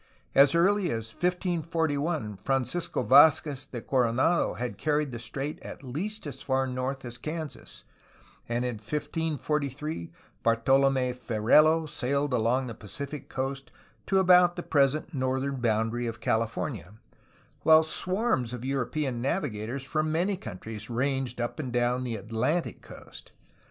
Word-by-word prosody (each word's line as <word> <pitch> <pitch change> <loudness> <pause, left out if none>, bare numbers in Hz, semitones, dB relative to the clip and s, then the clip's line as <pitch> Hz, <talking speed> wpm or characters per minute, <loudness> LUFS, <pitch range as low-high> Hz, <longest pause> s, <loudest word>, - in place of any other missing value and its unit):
As 140 +3 +6
early 190 +2 +3
as 115 -2 -3
1541, 165 - -1
Francisco 135 - -1
Vd 160 - +7
zquez 140 -3 -6
de 120 - -5
Coronado 130 +6 +2
had 120 -5 -4
carried 150 -2 0
the 120 - -6
strait 135 +6 -5
at - - -9
least 180 - -4
as 145 - -6
far 135 -1 +1
north 130 +1 -3
as 120 0 -8
Kansas, 155 +1 -6 0.7
and 120 +1 0
in 120 -3 -2
1543 150 - -3 0.3
Bartolom6 130 +2 +3
Ferrelo 150 +8 +4
sailed 140 -1 -1
along 125 +3 +2
the 120 - -5
Pacific 140 +8 -7
coast 135 +1 -4 0.4
to 195 - +2
about 180 -2 +6
the 175 - -5
present 145 +3 +1
northern 130 0 -1
boundary 115 0 0
of 110 -1 -5
California, 110 - -2 0.7
while 160 0 +7
swarms 180 - 0
of 125 0 -6
European 135 -1 -1
navigators 130 - -2
from 155 +3 -1
many 180 +5 +1
countries 110 - -8
ranged 130 0 -1
up 120 +5 -3
and 130 -5 -3
down 120 +1 +1
the 120 -3 -3
Atlantic 115 - -1
coast. - - -13
135 Hz, 135 wpm, -28 LUFS, 120-155 Hz, 0.7 s, Vd